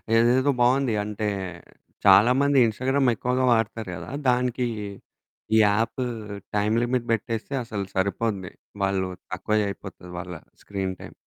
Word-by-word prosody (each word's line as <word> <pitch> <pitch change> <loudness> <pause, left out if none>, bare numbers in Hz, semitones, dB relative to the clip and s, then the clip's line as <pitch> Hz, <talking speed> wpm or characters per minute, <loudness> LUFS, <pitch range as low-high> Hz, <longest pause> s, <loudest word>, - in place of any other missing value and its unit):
ఇదేదో 125 +4 +4
బావుంది. 125 -1 +3
అంటే 105 0 -3 0.8
చాలామంది 135 +6 +6
ఇన్స్టాగ్రామ్ 130 +4 +1
ఎక్కువగా 125 +3 0
వాడతారు 110 -2 -1
కదా! - - -8 0.2
దానికి 125 0 +1 0.9
ఈ - - +6
యాపు 115 +5 +1 0.5
టైమ్ 105 +2 +2
లిమిట్ 120 -1 0
పెట్టేస్తే 115 +4 -3
అసలు 105 -4 -4
సరిపోద్ది. 100 0 -1 0.3
వాళ్ళు 95 -1 0 0.2
తక్కువ 105 +4 0
అయిపోతది 95 -2 -9
వాళ్ళ 90 0 -6 0.3
స్క్రీన్ 95 -2 -3
టైమ్. - - -10
115 Hz, 115 wpm, -25 LUFS, 100-125 Hz, 0.9 s, చాలామంది